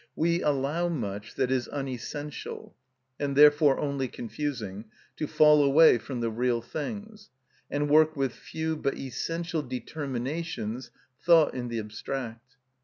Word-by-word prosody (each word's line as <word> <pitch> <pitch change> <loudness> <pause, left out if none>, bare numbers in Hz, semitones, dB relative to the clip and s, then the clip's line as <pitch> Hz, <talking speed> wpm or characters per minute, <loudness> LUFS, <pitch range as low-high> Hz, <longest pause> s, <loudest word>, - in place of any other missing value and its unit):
We 170 +2 +1
allow 150 +4 0
much 105 -9 -4
that 130 -1 0
is 130 -2 0
unessential, 140 +2 -6 0.4
and 140 -1 -1
therefore 150 -1 +6
only 140 -2 -1
confusing, 115 -4 -5 0.3
to 155 - -2
fall 150 -1 +6
away 140 -2 +6
from 125 0 -5
the 115 -1 0
real 120 +1 +1
things, 210 - -7 0.4
and 145 +1 0
work 155 +2 +5
with 135 -3 -1
few 160 0 -4
but 140 -2 -1
essential 165 +5 -3
determinations 130 -2 -4 0.3
thought 165 -3 +5
in 125 -1 -4
the 120 -1 -3
abstract. 115 +3 -6
140 Hz, 130 wpm, -28 LUFS, 125-155 Hz, 0.4 s, therefore